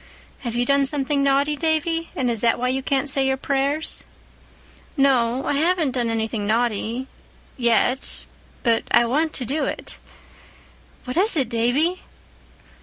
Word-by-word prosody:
"Have 235 -3 -5
you 245 0 +1
done 280 +1 +3
something 280 0 0
naughty, 280 +2 +2
Davy, 325 +2 -1
and 250 -3 0
is 225 -3 -3
that 230 -1 +3
why 250 +1 -1
you 265 +1 -1
can't 275 +1 0
say 270 -1 +2
your 265 0 +1
prayers?" 280 +3 0 0.9
"No, 260 -2 +2
I - - 0
haven't 320 0 +1
done 245 -2 -1
anything 220 -2 -2
naughty—yet. 235 +2 -1 0.4
But 230 -2 +2
I 240 - +4
want 305 +7 0
to 255 - -4
do 290 +6 -1
it." - - -6 1.0
"What 250 +4 -5
is 405 +3 +3
it, 260 -5 +1
Davy?" 260 +10 +1
265 Hz, 145 wpm, -22 LUFS, 240-290 Hz, 1.0 s, I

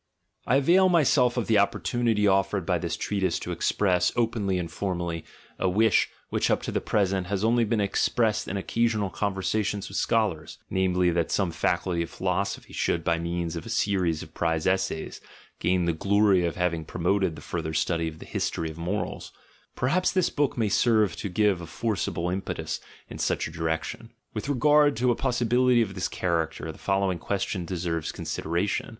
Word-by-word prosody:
— - - -33
I 125 - +3
avail 175 +7 +5
myself 140 -7 +3
of 120 - 0
the 110 -2 +3
opportunity 110 +1 +1
offered 95 -1 +1
by - - +1
this - - -3
treatise 95 -4 -1
to - - -5
express, 90 -4 +1
openly 115 -5 0
and 85 -2 -4
formally, 85 -3 -3 0.4
a 95 - +2
wish 110 +2 +3 0.2
which - - 0
up - - +1
to - - -3
the - - -1
present 95 -3 0
has 100 +1 -2
only 115 +1 +3
been 110 0 0
expressed 105 +2 +1
in 100 - -3
occasional 110 -1 0
conversa 100 +3 -1
tions 100 -1 -3
with 100 - -2
scholars, 100 -9 0
namely, 90 -1 +2
that 85 -1 0
some 95 -4 0
Faculty 85 +1 0
of 85 - -3
philosophy - - -2
should, 85 - 0
by 85 +1 +1
means 85 0 -3
of 85 - -5
a - - -7
series 95 -8 0
of - - -14
prize 80 -2 -1
essays, 95 -4 -1 0.4
gain 90 0 +1
the 85 - +1
glory 100 +1 +3
of 85 - -2
having 90 -2 0
promoted 90 +2 0
the - - -9
further 80 -2 -3
study 80 +1 0
of 80 -1 -6
the - - -11
history 80 -1 -2
of 80 - -12
mor 95 +6 -1
als - - -9 0.2
— - - -34
perhaps 170 +9 +1
this 185 -2 +1
book 145 -3 0
may 115 -2 +1
serve 110 -3 +3
to 100 - -4
give 100 -1 +2
a 85 - -8
forcible 90 -3 -2
impetus 95 +1 -3 0.3
in - - -9
such - - 0
a - - -9
direction. 80 +7 -3 0.2
With 110 +5 -4
regard 145 +1 +4
to 125 +1 +3
a - - +1
possibility 125 -1 +2
of 100 -3 -6
this 95 -2 -2
char 85 -3 0
acter, 80 0 -7
the - - -15
following 95 -2 0
question 95 -1 -2
deserves 85 -3 -2
consideration. 85 +5 -2
95 Hz, 190 wpm, -26 LUFS, 85-110 Hz, 0.4 s, avail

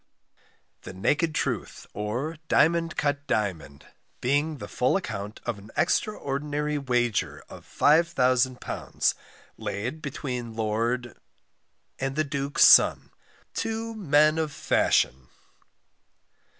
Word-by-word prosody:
THE - - -9
NAKED 150 - 0
TRUTH, - - -3
OR 120 +10 -3
DIAMOND 165 +1 +2
CUT 145 -1 -1
DIAMOND, 85 -9 -2 0.3
BEING 145 +4 0
THE - - -8
FULL 130 +9 +1
ACCOUNT 105 - -6
OF 115 -4 -3
AN 100 +2 -14
EXTRAORDINARY 150 -6 -1
WAGER 120 -4 -1
OF - - -12
£5000, 130 -5 +1 0.5
Laid 125 +10 -4
between 125 -5 -5
Lord 115 +3 -2 0.8
and 135 0 -2
the 155 - +2
Duke's 140 -1 +3
Son, - - +6 0.4
TWO 225 0 -3
MEN 155 -6 +3
OF 155 -2 -1
FASHION. 65 - +1
140 Hz, 100 wpm, -26 LUFS, 115-155 Hz, 0.8 s, Son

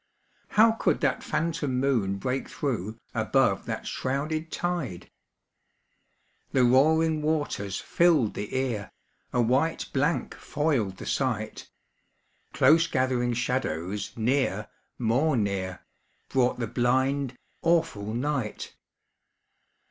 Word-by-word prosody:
How 225 +1 +8
could 225 - +1
that 140 -5 +1
phantom 155 -6 -1
moon 115 -8 +1
break 125 +6 -2
through, 110 -6 -3 0.2
Above - - +1
that - - -4
shrouded 155 +5 -2
tide? 170 - -3 1.4
The 130 - +4
roaring 155 +5 +4
waters 145 -11 -1
filled 165 -11 +3
the 105 - -5
ear, 120 -6 -2 0.4
A 120 - +2
white 135 +8 +1
blank 145 +5 0
foiled 135 -11 -1
the - - -8
sight. 110 -5 -2 0.8
Close 165 +1 +5
gathering 125 -2 +1
shadows 105 -6 -2
near, 115 -3 0 0.3
more 130 +5 +2
near, 95 -3 -2 0.5
Brought 125 -2 +2
the 120 - -1
blind, 130 +3 0 0.2
awful 165 -12 +1
night. 125 -2 -2
130 Hz, 105 wpm, -27 LUFS, 110-150 Hz, 1.4 s, How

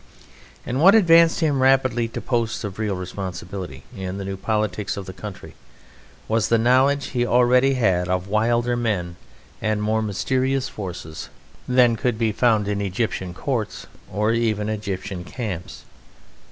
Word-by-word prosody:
And 130 +3 -2
what 195 +5 +8
advanced 165 -5 +5
him 145 -4 +2
rapidly 130 -3 +3
to 115 - -6
posts 115 -1 -1
of 105 -1 -6
real 105 -3 -1
responsibility 90 -4 -6
in 95 0 -5
the 100 - -5
new 95 0 -4
politics 105 -1 -2
of 100 - -5
the 95 - -8
country 105 -1 -9 0.7
was 110 -1 +1
the 115 - +4
knowledge 130 +5 +3
he 120 -2 0
already 125 +2 +4
had 95 -7 +1
of 90 +1 -1
wilder 120 +3 +1
men 100 -8 -2 0.5
and 110 -1 0
more 110 +1 0
mysterious 130 +6 0
forces 90 -6 -7 0.4
than 125 -2 +4
could 120 0 0
be 115 -1 +1
found 110 -2 +2
in 100 0 -1
Egyptian 95 -2 -2
courts 115 +1 -3 0.3
or 105 +3 +1
even 110 -2 0
Egyptian 100 -3 -4
camps. 95 -4 -6
110 Hz, 150 wpm, -22 LUFS, 95-125 Hz, 0.7 s, what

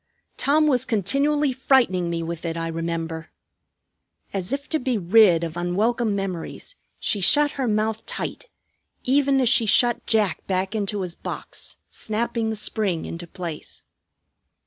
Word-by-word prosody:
"Tom 305 +2 +3
was 255 -4 +3
continually 275 +6 +1
frightening 240 -9 +2
me 165 -1 -2
with 165 0 -5
it, 165 -1 -3
I 165 0 -2
remember." 165 0 -4 1.0
As 190 0 -3
if 280 +1 -3
to 315 - +1
be 250 -3 0
rid 185 -2 +5
of 165 -1 -4
unwelcome 205 +6 0
memories 195 - -5 0.3
she 205 - 0
shut 290 +9 +5
her 265 -3 -2
mouth 220 0 0
tight, - - -5 0.5
even 275 +1 +3
as 255 - +2
she 235 -3 +4
shut 240 +3 +3
Jack 215 -5 +1
back 190 +1 -1
into 205 -1 -2
his 180 -2 -3
box, - - -7
snapping 225 +1 -2
the 220 - -2
spring 205 -5 -1
into 170 +1 -7
place. 170 -3 -7
215 Hz, 145 wpm, -23 LUFS, 175-255 Hz, 1.0 s, rid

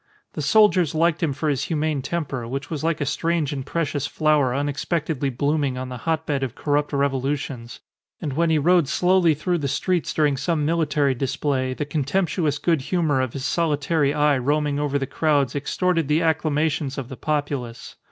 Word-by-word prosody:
The - - -4
soldiers 175 0 +4
liked 165 0 +2
him 160 -4 +1
for 150 +3 -3
his 145 -2 0
humane 155 -3 -1
temper, 135 -5 -3
which 140 +5 -5
was 155 -2 -3
like 165 -1 0
a - - +1
strange 165 0 0
and 135 -2 -4
precious 145 -2 -2
flower 150 -5 +2
unexpectedly 145 0 -1
blooming 140 +1 0
on 130 0 -5
the 125 - -6
hotbed 155 -3 0
of 130 -2 -3
corrupt 145 0 0
revolutions; 135 -3 -2 0.4
and 145 - -4
when 165 +4 +1
he 160 - +3
rode 170 +1 +3
slowly 180 0 +3
through 175 +4 -1
the 140 - -2
streets 175 +6 0
during 150 -3 +1
some 155 +1 0
military 150 -4 +1
display, 130 0 -1
the 150 - -3
contemptuous 150 +1 0
good 160 0 +1
humour 150 -3 +1
of 130 -3 -3
his 135 -1 -4
solitary 150 -2 +1
eye 145 -2 +2
roaming 145 +2 0
over 145 -1 0
the 135 - -2
crowds 145 -2 +1
extorted 165 +3 0
the 155 +3 +2
acclamations 155 -3 0
of 135 -3 -4
the 130 - -8
populace. 140 -5 -3
145 Hz, 180 wpm, -23 LUFS, 140-160 Hz, 0.4 s, soldiers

